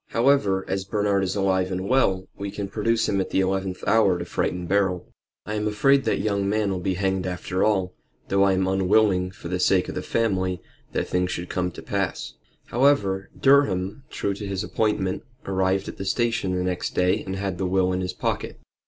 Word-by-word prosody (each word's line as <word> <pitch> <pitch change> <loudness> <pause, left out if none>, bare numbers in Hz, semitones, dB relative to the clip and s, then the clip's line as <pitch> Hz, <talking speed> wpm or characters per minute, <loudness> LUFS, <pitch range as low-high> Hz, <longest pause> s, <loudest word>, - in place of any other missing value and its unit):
However, 115 -6 +2
as 95 0 -1
Bernard 100 0 0
is 95 +1 -1
alive 95 -2 +1
and 95 +1 -3
well 95 -8 +2
we 100 0 -5
can 100 0 -4
produce 110 +3 0
him 100 -1 +1
at - - -4
the - - +1
eleventh 95 -1 -1
hour 100 -5 +4
to - - -5
frighten 90 0 -2
Beryl. 95 -1 +1 0.4
I 105 - -4
am 105 0 -1
afraid 135 +6 +3
that - - +1
young 100 -2 0
man 105 -1 +1
will 95 - -2
be 95 +1 -1
hanged 95 0 -1
after 90 +1 -2
all, 95 -4 +1 0.3
though 100 0 +2
I 100 -1 +4
am 95 0 +1
unwilling, 95 0 +3
for 90 -2 -10
the 90 +1 -2
sake 90 0 +2
of - - -4
the - - -3
family, 95 -5 0 0.3
that - - -1
things 90 0 0
should 90 -1 -4
come 90 0 -1
to - - -9
that - - -20
pass." 100 -2 -2 0.3
However, 105 -7 +2
Durham, 110 -6 +3
true 100 - -2
to 100 +1 -6
his 95 -1 -2
appointment, 95 -4 -1 0.2
arrived 95 0 0
at - - -7
the 95 - -5
station 105 -2 0
the 90 - 0
next 90 -1 -2
day 90 0 +2
and 95 - -4
had 95 -2 -3
the 95 - 0
will 95 0 +2
in 90 - -1
his 90 - -3
pocket. - - -3
95 Hz, 210 wpm, -24 LUFS, 95-105 Hz, 0.4 s, hour